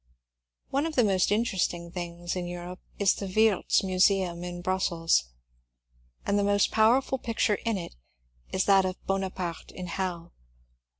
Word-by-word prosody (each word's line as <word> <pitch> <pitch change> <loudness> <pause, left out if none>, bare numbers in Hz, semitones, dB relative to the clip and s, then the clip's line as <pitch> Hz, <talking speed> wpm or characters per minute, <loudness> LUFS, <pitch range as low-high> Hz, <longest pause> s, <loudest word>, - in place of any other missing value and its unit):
One 280 +4 0
of 320 - -6
the 245 - +4
most 195 -2 +2
interesting 185 -6 0
things 175 0 -5
in 180 -1 -3
Europe 175 +1 -7 0.2
is 200 -2 +3
the 200 - -5
Wiertz 215 +1 +2
Museum 185 -2 +2
in 175 0 -6
Brussels, 175 - +1 1.0
and 200 0 +1
the - - +1
most 200 0 +2
powerful 245 +4 +3
picture 225 -3 0
in 225 -3 +1
it 175 - -7 0.6
is 190 - 0
that 195 -1 +5
of 185 0 -3
^' - - -31
Bonaparte 190 -3 -3
in 180 - -7
Hell. 175 -1 -4
190 Hz, 155 wpm, -28 LUFS, 175-205 Hz, 1.0 s, that